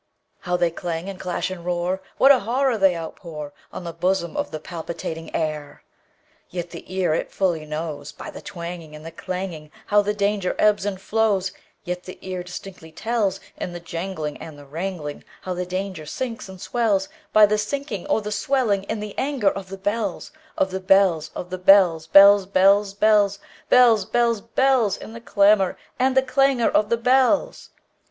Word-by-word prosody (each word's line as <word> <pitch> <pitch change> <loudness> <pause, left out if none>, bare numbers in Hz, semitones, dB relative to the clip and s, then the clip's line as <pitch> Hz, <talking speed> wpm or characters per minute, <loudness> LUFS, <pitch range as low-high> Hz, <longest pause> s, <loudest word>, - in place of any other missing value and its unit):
How 180 0 -1
they 175 -1 +1
clang, 170 +2 -4
and 195 - -8
clash, 180 0 -2
and 180 -2 -7
roar! 180 +2 -1 0.2
What 270 - +7
a 265 - +6
horror 250 +4 +1
they 195 -3 +4
outpourOn 160 -2 -7 0.3
the 170 -1 -6
bosom 175 0 -1
of - - -2
the 155 - -6
palpitating 165 0 -6
air! 155 -2 -3 0.7
Yet 175 -1 -5
the - - -10
ear 185 -4 +1
it - - -2
fully 170 -5 -1
knows, 155 -1 -5
By - - -9
the - - -10
twangingAnd 170 -4 -8
the 165 - -8
clanging, 170 -3 -6 0.2
How 205 0 +4
the 210 +1 -2
danger 200 -2 0
ebbs 210 -1 +3
and 195 -2 -3
flows; 200 -2 +1 0.3
Yet 180 0 -4
the 185 - -9
ear 185 -1 -4
distinctly 180 -2 -9
tells, 205 +1 -1 0.2
In 175 - -5
the 175 - -6
janglingAnd 165 -3 -5
the 145 0 -13
wrangling, 160 0 -5 0.2
How 185 - -3
the 180 0 -4
danger 185 -4 -4
sinks 230 +1 -5
and 190 -1 -10
swells,—By 215 -1 +2
the 210 +1 +1
sinking 215 -3 -4
or 220 - +1
the 210 - -4
swelling 210 -4 0
in 210 - -3
the 210 -1 -6
anger 265 -8 +1
of 195 -1 -7
the 195 - -7
bells, 205 0 -3 0.3
Of 190 - +1
the 190 - -3
bells, 190 -4 +3
Of 180 - -6
the 185 - -4
bells, 180 -4 +5
bells, 200 +2 +7
bells, 195 +1 +3
bells, 205 -1 +3 0.3
Bells, 235 -5 +6
bells, 235 -1 +1
bells—In 230 -3 +1
the 230 - -9
clamor 200 -3 +3 0.2
and 260 +1 +2
the 265 - +5
clangor 265 -2 +2
of 210 - +2
the 235 - +2
bells! 255 +4 +2
190 Hz, 175 wpm, -23 LUFS, 175-210 Hz, 0.7 s, What